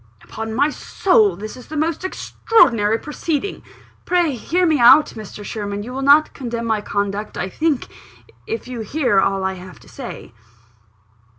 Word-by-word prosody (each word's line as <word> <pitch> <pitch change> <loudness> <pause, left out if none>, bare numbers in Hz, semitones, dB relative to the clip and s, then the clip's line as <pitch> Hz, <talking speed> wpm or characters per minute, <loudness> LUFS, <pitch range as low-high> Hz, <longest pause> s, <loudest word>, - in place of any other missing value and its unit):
"Upon 220 0 -6
my 285 +4 +2
soul 220 - +2
this 215 +4 -8
is 250 - -13
the 310 - -6
most 320 +3 -1
extraordinary 230 - +2
proceeding 300 +6 -3 0.2
!" - - -31
"Pray 350 -3 +2
hear 350 +9 0
me 315 -4 +2
out, 245 +6 +7
Mr. 210 -1 -9
Sherwin: 205 -1 -4
you 245 +3 -8
will 270 - -4
not 285 +3 +5
condemn 235 -3 -5
my 220 -2 0
conduct, 205 0 -3
I 185 - -3
think, 305 - -1 0.6
if 450 - -4
you 250 -2 -6
hear 235 -2 +1
all 195 0 +1
I 190 0 -1
have 185 0 -11
to - - -18
say." 245 - -9
240 Hz, 170 wpm, -20 LUFS, 205-305 Hz, 0.6 s, out